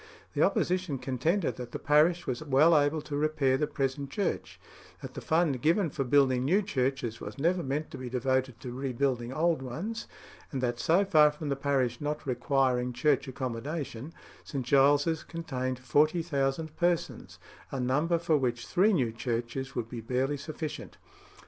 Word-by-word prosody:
The - - 0
opposition 180 -5 +1
contended 155 +9 -1
that 120 -1 -7
the - - -2
parish 155 +4 +3
was 125 +1 -3
well 155 +3 +4
able 145 +1 +2
to 145 - -5
repair 145 -3 +2
the 150 +3 0
present 140 -1 -2
church; 200 - -3 0.4
that - - -7
the - - -7
fund 160 -6 +1
given 165 +2 +2
for 135 - -2
building 130 -1 +3
new 185 +10 +3
churches 130 - -2
was 105 - -7
never 175 +5 +1
meant 145 +2 -3
to - - -8
be 130 -1 -5
devoted 130 -1 0
to 125 - -6
rebuilding 130 -1 -1
old 160 +1 +1
ones; 175 - -5 0.4
and 135 - -3
that 120 -2 -1
so 180 +5 +3
far 155 -5 +6
from 150 0 -6
the 140 - +1
parish 135 -3 0
not 150 +1 -3
requiring 125 -1 +1
church 140 +3 +1
accommodation, 130 +2 -4 0.3
St. 135 -5 -4
Giles's 145 +4 +3
contained 130 -6 -4
40,000 150 +2 +1
persons, 175 -1 -1 0.3
a 135 - -4
number 150 +7 +1
for 165 -2 +2
which 120 -3 -1
three 205 +4 +3
new 130 -10 +1
churches 120 +3 -3
would 120 -2 -2
be 115 -1 -7
barely 130 +5 0
sufficient. 155 +1 -6
140 Hz, 165 wpm, -29 LUFS, 130-155 Hz, 0.4 s, far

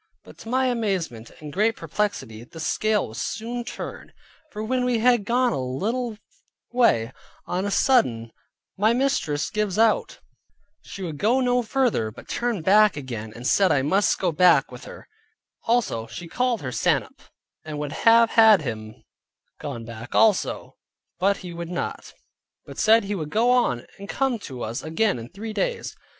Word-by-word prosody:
But - - -16
(to 225 - -10
my 260 +2 +2
amazement 190 - -2
and 150 -2 -8
great 215 +3 +2
perplexity) 155 - -3
the 165 +7 -12
scale 210 - 0
was 110 - -6
soon 240 +2 -4
turned; 240 - -8 0.4
for 215 - -5
when 250 +3 0
we 250 -1 +1
had 240 -2 +3
gone 245 +1 +2
a - - -2
little 215 - -2 0.5
way, 130 - +2 0.3
on 185 +2 -2
a - - -1
sudden 125 - +2 0.5
my 215 +3 +4
mistress 235 - 0
gives 210 -3 -1
out; 225 - +2 0.6
she 195 - -9
would 160 -5 -5
go 235 +5 +3
no 250 -1 +2
further, 240 - 0
but 110 - -13
turn 235 -8 -2
back 210 0 +5
again, 115 -6 -6
and 120 - -9
said 190 +7 +3
I 135 - +2
must 190 +8 +2
go 180 -2 0
back 180 +2 +5
again - - -27
with - - -10
her, - - -11 0.6
and 220 - 0
she 145 +10 -8
called 245 +2 -1
her 130 - -3
sannup, - - 0 0.4
and 155 -1 -6
would 145 -1 -4
have 230 +6 +4
had 220 -6 +6
him 110 -4 -6 0.6
gone 120 -6 -6
back 115 +1 -8
also, 220 -4 +2 0.4
but 200 +2 +2
he 175 - -7
would 170 0 -6
not, 175 - -5 0.5
but - - -10
said 225 +1 +5
he 200 +1 -3
would 155 -6 -4
go 230 +8 +2
on, 180 - +1
and 200 +1 -9
come 265 -4 0
to 130 -10 -7
us 115 +2 -4
again 175 - 0
in 115 +1 -9
three 215 +5 -7
days. - - -2
200 Hz, 175 wpm, -24 LUFS, 145-235 Hz, 0.6 s, had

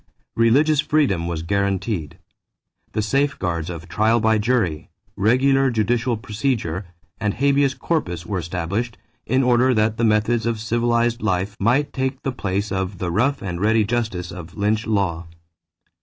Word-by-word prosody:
Religious 140 +7 +4
freedom 135 - +1
was 80 -2 -3
guaranteed. 95 -3 -1 0.8
The 110 - 0
safeguards 100 - -1
of 85 -1 -7
trial 110 +5 +2
by 110 0 +3
jury, 105 -9 0 0.3
regular 135 +6 +3
judicial 120 +1 0
procedure, 105 - -2 0.3
and 105 -2 -1
habeas 140 0 +2
corpus 90 - -2
were 100 -1 -2
established, 95 +8 -3 0.3
in 130 +1 +2
order 125 +1 +3
that 110 +1 +1
the 115 - -1
methods 110 +2 +2
of 115 -2 -1
civilized 120 +1 +1
life 100 0 -1
might 125 +8 +2
take 130 0 -2
the 135 - -1
place 100 -4 -2
of 95 0 -2
the 90 -1 -3
rough 120 +9 +1
and 90 -2 -4
ready 110 +1 +3
justice 105 -6 -2
of 90 +1 -10
lynch 105 +2 0
law. 90 -6 0
110 Hz, 145 wpm, -22 LUFS, 95-120 Hz, 0.8 s, Religious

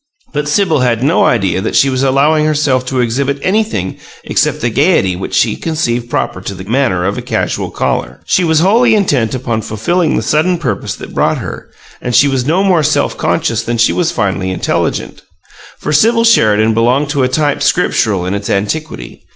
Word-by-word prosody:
But 150 0 -2
Sibyl 160 0 +1
had 120 -2 0
no 155 +6 +3
idea 100 -5 +1
that 110 - -3
she 140 - +4
was 130 -1 -1
allowing 140 +3 +2
herself 145 -4 0
to 130 -1 0
exhibit 135 +4 -1
anything 190 - -1 0.3
except - - 0
the 120 - 0
gaiety 135 - +2
which 90 - -5
she - - +2
conceived 120 -8 -2
proper 95 - -2
to 100 +1 -6
the 95 - -8
manner 105 -5 0
of 100 +2 -2
a - - -5
casual - - -2
caller. - - -3
She 185 - +1
was 160 -2 +2
wholly 220 +6 +4
intent 135 - +1
upon 120 -3 -2
fulfilling 150 - -1
the - - -1
sudden 155 +9 +1
purpose 165 - -3
that - - -10
brought - - +1
her, - - -7 0.3
and 125 -1 -2
she 140 +4 +5
was 135 -2 -1
no 175 +5 +2
more 185 -4 +3
self 150 +1 0
conscious 115 -9 -1
than 120 0 -3
she 115 - +3
was 175 -2 0
finely 95 - -1
intelligent. 95 - -2 0.6
For - - -3
Sibyl 230 +9 +3
Sheridan 110 - +3
belonged 125 +6 +1
to 145 -2 0
a 130 - +3
type 145 +2 0
Scriptural 110 - +1
in 90 - -2
its 100 0 -4
antiquity. 105 - -4
130 Hz, 190 wpm, -13 LUFS, 110-160 Hz, 0.6 s, she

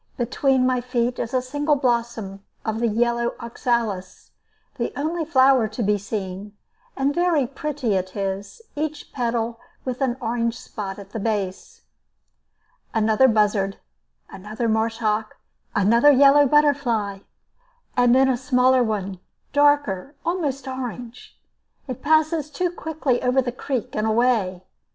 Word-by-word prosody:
Between 260 +2 +1
my 255 -1 +1
feet 245 0 -1
is 230 - -3
a 255 -1 0
single 290 +3 0
blossom 235 -7 -1 0.2
of 220 0 -2
the 235 - +1
yellow 235 +2 0
oxalis, 230 -5 -3 0.5
the - - -1
only 325 +3 -1
flower 265 -6 +4
to 215 +2 -4
be 205 0 +2
seen; 200 0 -6 0.4
and 275 +1 +1
very 345 -5 +2
pretty 275 -3 -3
it 185 -1 -2
is, 195 - -4
each 305 0 -4
petal 235 -2 -2 0.3
with 255 0 -4
an 255 -2 0
orange 230 -1 -1
spot 195 -3 -6
at 200 -1 -11
the 225 - -4
base. 200 -3 -3 1.1
Another 220 +4 +4
buzzard, 210 -3 +1 0.5
another 215 +4 -5
marsh 225 +1 0
hawk, 215 -1 -1 0.4
another 230 +8 +5
yellow 285 +1 +6
butterfly, 250 -9 +2 0.8
and 245 0 +4
then 265 +1 +5
a 260 -2 +2
smaller 255 0 +3
one, 200 -5 -2 0.3
darker, 285 -5 +2
almost 290 -7 -2
orange. 245 -2 -7 0.5
It 255 -3 -6
passes 315 0 +2
too 355 +3 -1
quickly 315 -7 -2
over 250 +1 +2
the 250 -2 0
creek 250 0 -4
and 215 +1 0
away. 220 -6 +1
240 Hz, 135 wpm, -23 LUFS, 215-270 Hz, 1.1 s, yellow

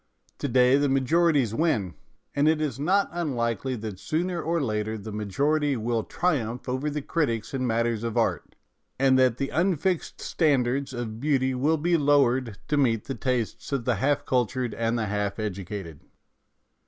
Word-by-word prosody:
To - - -1
day 125 +1 +4
the 145 0 +2
majorities 135 -2 +2
win, 115 - 0 0.4
and 145 +2 +3
it 160 0 +3
is 140 -5 -2
not 190 +7 +2
unlikely 130 - -1
that 105 -4 -6
sooner 170 - -1
or 170 +1 0
later 110 -4 -2
the 110 +1 -8
majority 140 +8 0
will 115 0 -1
triumph 125 -9 -1
over 130 +4 -1
the 150 -1 -4
critics 115 -11 -1
in 130 -2 -1
matters 115 -1 0
of 115 -2 -3
art, - - 0 0.4
and 135 0 +4
that 125 -2 +3
the 140 0 -2
unfixed 180 +1 0
standards 140 -3 +1
of 115 -3 -5
beauty 135 -2 +1
will 145 +6 +1
be 170 +3 +2
lowered 130 -6 +2
to 150 - +1
meet 115 -6 +2
the 135 - -3
tastes 125 -3 -2
of 135 -4 -1
the 125 - +1
half 145 +1 +1
cultured 125 -2 0
and 115 +1 -1
the 110 - -1
half 105 -1 -2
educated. 95 -5 -5
130 Hz, 165 wpm, -26 LUFS, 115-145 Hz, 0.4 s, day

